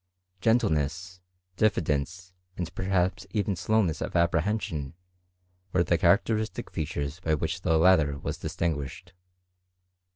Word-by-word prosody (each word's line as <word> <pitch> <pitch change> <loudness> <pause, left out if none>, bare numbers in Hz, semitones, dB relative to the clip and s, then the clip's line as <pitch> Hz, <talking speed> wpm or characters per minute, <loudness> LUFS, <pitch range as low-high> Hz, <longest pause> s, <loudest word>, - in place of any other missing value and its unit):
Gentleness, 90 - 0 0.4
dijffidence, 90 -2 0 0.3
and 85 -2 -4
perhaps 95 0 0
even 100 -1 -1
slowness 100 -4 +1
of - - -4
apprehension, 85 -3 0 0.8
were 85 - +4
the 85 - +2
characteristic 105 +5 +1
features 75 0 -3
by 80 -3 +1
which 80 +4 -3
the 80 -3 +2
latter 80 -4 +4
was 70 - -5
distinguished. 85 +2 -3
90 Hz, 105 wpm, -27 LUFS, 80-95 Hz, 0.8 s, were